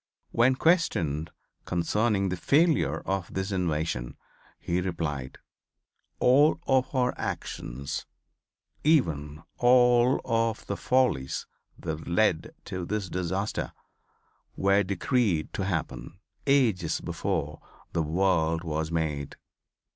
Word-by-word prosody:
When 120 +3 +4
questioned 85 - +1 0.4
concerning 100 +3 +1
the 90 - -1
failure 140 - +2
of 95 -3 -3
this 95 +1 -3
invasion 80 -9 -2 0.4
he 90 +1 -1
replied: 80 -7 -3 0.8
"All 140 +5 +4
of 130 0 +1
our 125 -1 +2
actions, 65 +3 -4 0.8
even 80 - +1 0.2
all 125 0 +5
of 115 -1 0
the 100 - -3
follies 125 - +1 0.3
that 80 -1 -5
led 85 -2 +1
to 90 -1 -4
this 100 +1 -3
disaster, 95 +4 -2 0.8
were 100 +1 +3
decreed 100 - 0
to 95 - -2
happen 85 -6 -4 0.3
ages 110 - +2
before - - -3 0.3
the 85 - +1
world 80 0 +1
was 80 -1 -2
made." 75 -4 -2
95 Hz, 100 wpm, -27 LUFS, 80-120 Hz, 0.8 s, all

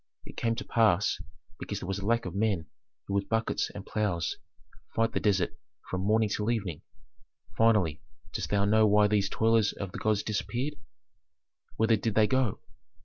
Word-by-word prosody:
It - - -11
came 115 -1 0
to - - -6
pass 105 -5 +2 0.4
because 105 - -4
there 90 - -7
was 95 +1 -2
a 100 - -6
lack 115 0 +2
of 90 - -5
men 100 -5 0 0.4
who 100 - -4
with 100 0 0
buckets 115 0 0
and - - -9
ploughs 100 -6 -1 0.6
fight 115 0 +2
the - - -1
desert 100 -1 +1 0.4
from 95 - -1
morning 110 +3 +3
till 105 +2 -1
evening. 100 -9 -2 0.7
Finally, 105 -9 +3 0.3
dost - - -3
thou 100 -1 +2
know 110 +1 +4
why 105 0 +5
these 105 -1 +2
toilers 110 -1 +2
of 95 -2 -6
the - - -6
gods 110 -1 +1
disappeared? 120 +6 -2 1.0
Whither 110 0 +3
did 110 -1 -2
they 110 - +5
go? 130 -3 0
105 Hz, 175 wpm, -29 LUFS, 100-115 Hz, 1.0 s, why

